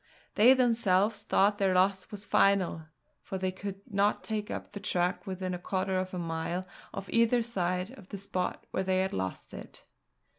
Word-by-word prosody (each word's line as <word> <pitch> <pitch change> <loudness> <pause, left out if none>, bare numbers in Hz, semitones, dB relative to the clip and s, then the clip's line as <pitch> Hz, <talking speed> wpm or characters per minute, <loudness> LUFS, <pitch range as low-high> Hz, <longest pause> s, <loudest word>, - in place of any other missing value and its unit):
They 245 +5 +7
themselves 225 -5 +3
thought 205 +2 +2
their 190 -2 +2
loss 190 0 +2
was 205 -2 -7
final, 185 -7 +2 0.3
for 190 - -5
they 185 0 -1
could 195 +1 -7
not 205 -3 +1
take 215 -2 -3
up - - -5
the 205 - -7
track 180 0 -1
within 185 -1 -3
a 180 - -4
quarter 185 +1 -1
of 185 0 -3
a 185 - -5
mile 170 +1 -3 0.3
of 195 0 -6
either 230 +1 +3
side 185 -3 -1
of 195 - -15
the 200 - -5
spot 185 -2 -3
where - - 0
they 185 0 +1
had 190 - -1
lost 95 0 -4
it. - - -10
190 Hz, 185 wpm, -30 LUFS, 185-205 Hz, 0.3 s, They